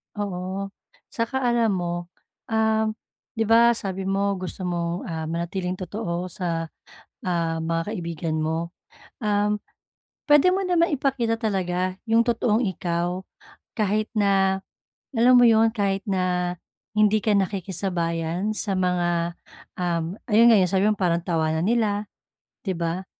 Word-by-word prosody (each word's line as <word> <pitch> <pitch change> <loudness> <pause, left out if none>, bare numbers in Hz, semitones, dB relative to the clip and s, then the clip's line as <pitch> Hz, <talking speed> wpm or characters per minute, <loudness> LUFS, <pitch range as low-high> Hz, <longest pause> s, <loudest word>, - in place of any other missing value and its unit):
Oo. 195 -1 -4 0.4
Saka 245 +4 -2
alam 235 -2 +2
mo, 175 -1 -2 0.5
um, 220 -1 +1 0.4
'di 225 - +1
ba 235 +1 +6
sabi 195 -3 -4
mo 200 0 +1
gusto 185 +1 -5
mong, 175 0 -2
ah, 160 -2 -4
manatiling 175 +3 -2
totoo 185 -1 -4
sa, 165 -2 -2 0.5
ah, 170 -4 -1
mga 165 +4 -1
kaibigan 165 -4 -3
mo. 165 +2 -2 0.5
Um, 210 -1 +1 0.7
puwede 295 +5 +6
mo 380 - +1
namang 345 -2 +2
ipakita 250 -5 0
talaga 185 -4 -1
'yong 230 +1 +4
totoong 230 0 +2
ikaw, 175 0 -2 0.5
kahit 215 -1 +1
na, 195 -2 +2 0.5
alam 240 +2 +5
mo 245 - +7
'yon, 225 0 +4
kahit 200 -3 0
na 180 -2 0 0.4
hindi 215 0 +4
ka 215 - +3
nakikisabayan 185 -1 -1
sa 200 -2 -1
mga, 175 -2 0 0.5
um, 170 -1 -1 0.2
ayun 230 +2 +7
'yong 190 -4 +4
sabi 190 +1 +2
mo - - +3
parang 170 -2 +1
tawanan 160 -1 0
nila, 210 -2 +1 0.6
'di 190 - 0
ba. 170 +2 -2
190 Hz, 130 wpm, -24 LUFS, 175-220 Hz, 0.7 s, mo